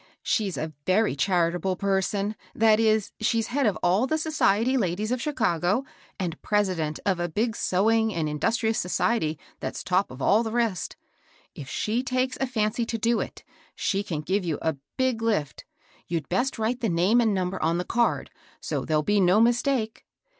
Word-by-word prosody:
She's 205 -5 0
a 155 0 -4
very 200 -2 +3
charitable 180 +3 +1
per^ 195 -1 +1
son, 205 +2 -2
— 185 - -29
that 220 -1 +4
is, 220 -2 +2
she's 225 0 0
head 275 -3 +2
of 205 - 0
all 190 +8 +3
the 315 - +1
society 260 -6 +2
ladies 210 -1 -1
of 250 -1 -1
Chicago, 220 - 0 0.3
and 175 -4 -3
president 185 -7 0
of 190 -3 +1
a 175 0 -1
big 220 +7 -1
sewing 220 +4 +2
and 165 -5 -1
in 150 0 -4
dustrious 225 +2 +1
society 180 -2 0 0.2
that's - - -5
top 185 +2 +1
of 130 - -10
all 205 - +4
the 225 - -2
rest. 230 -6 -1 0.6
If 135 - -9
she 225 +3 -1
takes 255 0 -1
a 270 - +1
fancy 225 -1 0
to 230 0 -2
do 230 +1 +1
it, - - -6 0.3
she 195 - 0
can 165 -7 -4
give 190 +6 0
you 165 -4 -1
a 160 -3 0 0.2
big 260 -3 +1
lift. 210 -11 -1 0.4
You'd 165 -3 -2
best 245 +9 0
write 225 +3 -1
the 230 -3 0
name 185 +8 +3
and 225 -2 +2
number 185 -1 -2
on 165 +2 +1
the 180 - -2
card, 235 0 0 0.3
so - - -3
there'll 155 -1 +1
be 205 +4 +2
no 185 +3 +4
mistake." 235 0 +1
210 Hz, 190 wpm, -26 LUFS, 180-230 Hz, 0.6 s, that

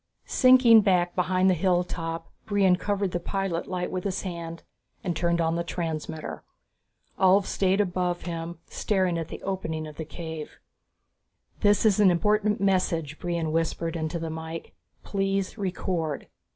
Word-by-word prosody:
Sinking 255 -3 +7
back 180 -3 +2
behind 185 +1 +2
the 190 - +5
hilltop, 170 -2 -1 0.2
Brion 195 -3 +4
covered 200 0 -1
the 175 - -1
pilot 190 -1 -2
light 180 -1 -3
with 185 -1 -3
his 195 -2 -2
hand 170 -3 -6 0.4
and 175 -3 -1
turned 170 0 +1
on 165 -1 +1
the 170 - -1
transmitter. 160 -2 -4 0.8
Ulv 190 +1 +5
stayed 190 +1 +1
above 180 -2 0
him, 170 -1 -5
staring 185 -4 0
at 165 - -4
the - - -9
opening 165 -5 -3
of 150 -1 -10
the 160 - -3
cave. 160 -1 -7 1.0
"This 205 +1 +3
is 210 -2 +4
an 205 -3 +7
important 210 +4 +2
message," 170 -6 0
Brion 170 -3 -2
whispered 165 +1 -1
into 160 +1 -2
the 165 -1 -4
mike. 160 +1 -6 0.3
"Please 195 -1 -1
record." 180 -6 -2
180 Hz, 150 wpm, -26 LUFS, 165-195 Hz, 1.0 s, Sinking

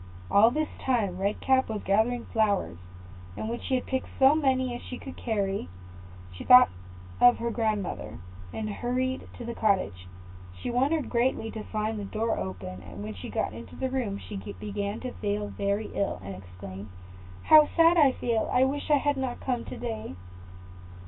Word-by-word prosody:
All 215 +3 +7
this 305 +5 -1
time 210 -8 0
Red 200 +2 -1
Cap 260 -2 +3
was 215 -2 -3
gathering 225 +5 +1
flowers; 205 - +1 0.6
and - - -3
when 235 +1 -3
she 260 - -1
had 255 - -1
picked 260 -1 -2
as 270 +2 +7
many 260 -4 +1
as 240 - -6
she 250 - -7
could 270 - -9
carry, 200 - -2 0.6
she 90 - -8
thought 250 0 +8 0.5
of 245 0 +7
her 235 0 -2
grandmother, 210 - -2 0.3
and 215 - -4
hurried 255 +4 -2
to 240 - -7
the 235 - -4
cottage. 190 - 0 0.5
She - - -3
wondered 275 +4 +1
greatly 235 -2 +1
to 220 - -6
find 215 0 -2
the 205 - -4
door 220 +3 -1
open; 90 0 -6
and 90 +3 -9
when 105 +1 -5
she 90 - -8
got - - -2
into 115 +1 -10
the 260 -1 -2
room, 235 -7 -1
she 200 - -8
began 205 +1 -5
to 255 - -4
feel 205 -1 -2
very 200 +2 -2
ill, 195 - -1
and 100 +2 -6
exclaimed, 95 +2 -9 0.5
"How 310 -1 +7
sad 330 +1 +6
I 290 -6 +5
feel! 230 -3 -1
I 250 - +4
wish 280 +3 -1
I 295 - +6
had 290 0 0
not 260 -2 -3
come 250 -3 -2
to - - -7
day." 225 - -5
225 Hz, 180 wpm, -28 LUFS, 200-255 Hz, 0.6 s, thought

